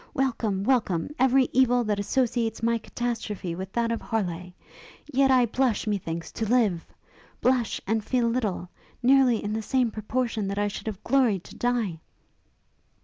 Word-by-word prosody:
Welcome, 230 -7 0
welcome, 210 - +1
every 260 0 +4
evil 245 -1 +4
that 210 -2 -1
associates 230 +1 0
my 230 0 +2
catastrophe 220 -6 -4
with 190 +3 -6
that 235 -1 0
of 230 - -2
Harleigh! 180 -5 -3 0.5
Yet 275 -2 +2
I 255 -2 +5
blush, 240 -1 0
methinks, 170 -6 -3
to 225 - -3
live! 215 -9 +2 0.5
Blush, 250 -3 +1
and 220 +1 0
feel 245 +1 +1
little, 215 -7 -1 0.3
nearly 255 -3 +4
in 205 +1 -2
the 220 - -1
same 245 +1 +1
proportion 220 -1 -2
that 200 +1 -3
I 205 0 +1
should 205 - -7
have 210 -3 -5
gloried 240 -9 +2
to - - -13
die!' 235 -9 -1
225 Hz, 155 wpm, -26 LUFS, 205-250 Hz, 0.5 s, I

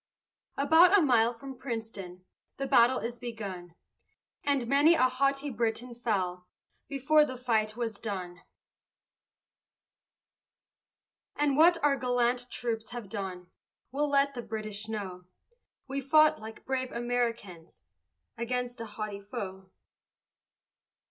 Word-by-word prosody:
About 325 +7 +6
a - - +5
mile 235 -4 +4
from 260 +2 -10
Princeton, 210 -7 -6 0.3
The 275 - -2
battle 250 0 +5
is 235 +1 -5
begun, 195 -8 -7 0.7
And 280 -4 +1
many 285 +7 +5
a 255 - +3
haughty 275 +2 +1
Briton 235 +1 -2
fell 185 -7 -2 0.4
Before 300 +2 +3
the 260 -3 -4
fight 220 -3 0
was 225 -4 -3
done. 180 -4 -5 2.9
And 290 -2 +1
what 335 +3 +6
our 285 -2 +3
gallant 245 -1 0
troops 225 -2 -3
have 240 -5 -7
done 185 -3 -6 0.4
We'll 290 +2 0
let 280 0 +3
the 245 - -5
British 215 -2 -5
know; 190 -5 -5 0.6
We 275 +1 -3
fought 305 +2 +4
like 220 0 -10
brave 260 -1 -2
Americans 235 -8 -3 0.6
Against 245 0 -3
a 230 - -5
haughty 210 -1 -5
foe. 190 -1 -7
240 Hz, 115 wpm, -29 LUFS, 215-270 Hz, 2.9 s, About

